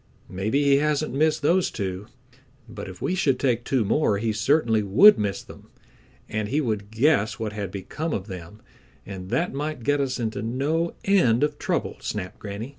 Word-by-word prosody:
"Maybe 110 +10 0
he 140 -1 +5
hasn't 150 +1 0
missed 155 +2 +1
those 175 +4 +3
two, 95 0 -5 0.6
but 110 -4 -8
if 90 -1 -10
we - - 0
should 145 -9 +1
take 120 -3 +1
two 125 -4 0
more 105 -2 +2
he 110 +1 -1
certainly 115 0 +2
would 110 - +7
miss 100 -2 -2
them, - - -14 0.6
and 105 -1 -3
he 145 - +1
would 105 -7 -2
guess 110 -2 +2
what 110 -2 -4
had 100 -3 -4
become 105 - -5
of 95 -9 -3
them, 95 +1 -10 0.4
and 95 -2 -8
that 170 - 0
might 150 -2 -4
get 145 +3 +1
us 130 -2 -2
into 110 -3 -3
no 145 +9 -1
end 150 - +3
of 150 - -1
trouble," - - -2
snapped 95 -3 -5
Granny. 105 +4 -6
115 Hz, 185 wpm, -24 LUFS, 105-150 Hz, 0.6 s, would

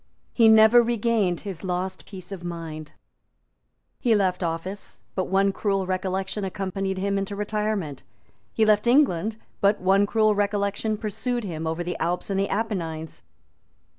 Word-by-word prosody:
He 230 -2 +5
never 220 +2 +7
regained 230 -6 +1
his 195 -4 -7
lost 185 0 -3
peace 185 -2 -9
of 190 -3 -7
mind. 160 -3 -6 1.1
He 235 -3 +3
left 190 -3 +1
office; 175 +4 -4
but 185 - -1
one 195 +1 +2
cruel 195 -1 -1
recollection 190 +2 -2
accompanied 190 0 -3
him 200 +1 0
into 195 +1 -4
retirement. 210 -7 -2 0.5
He 220 - +2
left 215 +1 +3
England; 225 - +3 0.2
but 200 +1 +3
one 195 +2 +3
cruel 215 0 +3
recollection 205 +1 0
pursued 235 +3 -2
him 165 -5 -4
over 165 +2 -2
the 175 0 -4
Alps 175 +4 -1
and 195 - 0
the 195 - 0
Apennines. 170 -7 -3
195 Hz, 145 wpm, -25 LUFS, 180-215 Hz, 1.1 s, never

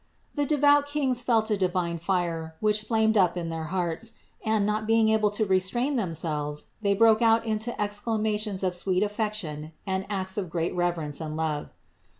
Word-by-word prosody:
The 290 -1 -1
devout 290 0 +4
kings 275 -4 +1
felt 225 -3 +1
a 210 - +2
divine 180 -3 -1
fire, 170 -2 -2
which 210 0 +1
flamed 220 0 +2
up 180 -2 +3
in 170 -1 -3
their 165 -1 -4
hearts, 180 +6 -2 0.3
and, 220 -2 +1
not 215 +1 -1
being 225 -1 +4
able 215 -1 +3
to 205 +1 0
restrain 205 +9 +1
themselves, 155 - -1 0.2
they 200 -1 +2
broke 220 +1 +5
out 225 0 +4
into 220 +2 -2
exclamations 210 -1 -1
of 185 -1 +1
sweet 185 +2 +1
affection 205 -8 -3
and 190 0 -2
acts 190 -1 -1
of 185 -4 -4
great 165 0 -2
reverence 170 -4 -1
and 155 -1 -4
love. 155 -2 -2
205 Hz, 170 wpm, -27 LUFS, 175-220 Hz, 0.3 s, broke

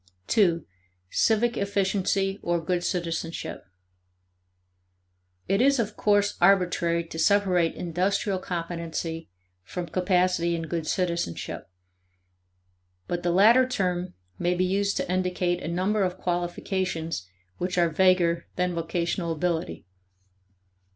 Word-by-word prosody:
(2) 170 -7 +3 0.5
Civic 230 +2 +2
efficiency, 195 0 0
or 175 0 0
good 175 +2 -1
citizenship. 165 -2 -3 1.8
It 195 +3 +2
is, 275 +2 +4
of 220 -3 -1
course, 205 -1 +2
arbitrary 175 -2 +3
to 165 -1 -8
separate 180 -2 +3
industrial 185 +3 -1
competency 165 - -4 0.3
from 175 - -5
capacity 180 -1 +1
in 165 - -3
good 160 0 -3
citizenship. 170 - -2 1.4
But 175 0 -2
the 175 - 0
latter 225 +8 +6
term 185 -7 -2 0.2
may 175 +1 +1
be 185 +1 +1
used 200 +2 0
to - - -1
indicate 180 -1 0
a - - -5
number 185 +5 0
of 185 -1 0
qualifications 175 - -2 0.3
which 180 0 -2
are 170 -1 +4
vaguer 170 -1 +3
than 180 0 0
vocational 170 +1 -2
ability. 160 - -2
180 Hz, 110 wpm, -26 LUFS, 170-195 Hz, 1.8 s, latter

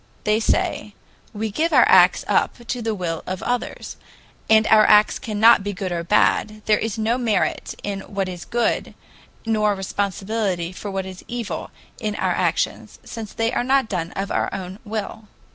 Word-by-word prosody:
They 210 +1 +2
say: 215 -2 -1 0.4
"We 215 0 -4
give 320 +10 0
our - - +6
acts - - +5
up - - +1
to 245 +1 -3
the 225 -1 -2
will 170 -4 -3
of 185 -1 -4
others, 245 0 -3 0.5
and 220 0 +6
our 215 -1 +6
acts 210 0 +5
cannot 220 0 +4
be 205 0 -3
good 190 -1 -4
or 170 -1 -2
bad; 215 +3 +1
there 210 -1 +3
is 225 0 -3
no 225 +3 0
merit 225 -5 -1
in 200 -1 -3
what 195 -1 -1
is 180 -2 -7
good 240 0 -1 0.5
nor 215 -2 +1
responsibility 195 -1 -2
for 200 +2 -7
what 195 -1 -3
is 185 -1 -9
evil 240 -3 -5 0.3
in 215 -3 -3
our - - 0
actions, - - -1
since 220 -3 -7
they 225 +2 -1
are - - 0
not 265 -2 +2
done 170 -4 -2
of 195 +1 -4
our - - 0
own 190 +1 -6
will." 215 0 -5
210 Hz, 180 wpm, -22 LUFS, 195-225 Hz, 0.5 s, our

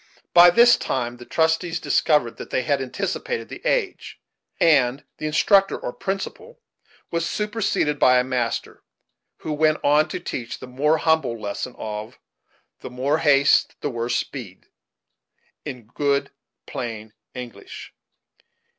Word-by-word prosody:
By 175 0 +9
this 240 +6 +6
time 120 -2 -3
the 120 - -13
trustees 160 +1 +1
discovered 150 -7 +1
that - - -8
they 130 - 0
had 140 +2 0
anticipated 195 - -3
the - - -9
age - - -2 0.4
and 140 -4 +3 0.2
the 155 - -2
instructor, 195 +6 +3
or 125 - -5
principal, 200 - -5 0.5
was 170 0 -1
superseded 210 -8 -1
by 125 0 +5
a 125 - +3
master, 125 -2 -3 0.6
who 155 - -3
went 155 +1 +2
on 150 +2 +4
to - - -5
teach 120 -3 -5
the - - -9
more 145 +5 +1
humble 160 -8 +1
lesson 105 +4 -5
of 110 +2 -6 0.6
"the - - -8
more 135 +5 0
haste 145 -3 +4
the 145 - -2
worst 120 0 -1
speed," 115 -9 -7 1.0
in 125 -6 -7
good 140 +4 -1 0.3
plain 110 -2 -6 0.2
English. 120 -5 -9
145 Hz, 135 wpm, -23 LUFS, 125-165 Hz, 1.0 s, By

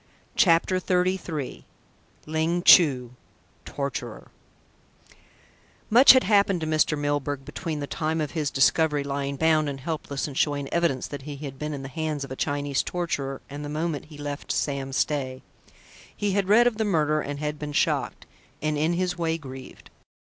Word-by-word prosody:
CHAPTER 185 -1 +3
XXXIII 180 -6 -1 0.6
LING 160 +3 -1
CHU 130 -11 +6 0.5
TORTURER 140 -3 -5 1.6
Much 250 +5 +9
had 260 - +4
happened 200 -3 +3
to - - -2
Mr. 155 -1 +2
Milburgh 145 -1 -2
between 155 +1 -5
the - - -2
time 160 +2 -2
of 150 -2 -2
his 155 -4 -1
discovery 145 +2 +2
lying 140 0 -3
bound 155 0 +2
and 135 -1 -5
helpless 145 -2 -3
and 145 - -7
showing 145 -1 0
evidence 170 -7 +1
that 145 - -7
he 145 +1 -7
had 135 -2 -8
been 150 0 -3
in 135 - -7
the - - -5
hands 150 +1 -3
of 140 - -8
a - - -4
Chinese 145 0 -1
torturer 140 -6 -3
and 145 +1 -7
the 145 - -5
moment 155 0 -3
he 150 -1 -13
left 145 0 -5
Sam 140 -2 -2
Stay. 130 -2 -1 0.7
He 205 -1 0
had 195 0 0
read 230 +4 +6
of 240 -3 +1
the 220 - +1
murder, 155 -6 +1
and 145 0 -5
had 150 0 -3
been 150 -1 -5
shocked, 145 - 0 0.3
and, 155 -1 -1
in 160 +3 +1
his 180 0 -1
way, 165 -1 0
grieved. 130 -4 -11
150 Hz, 170 wpm, -25 LUFS, 140-165 Hz, 1.6 s, Much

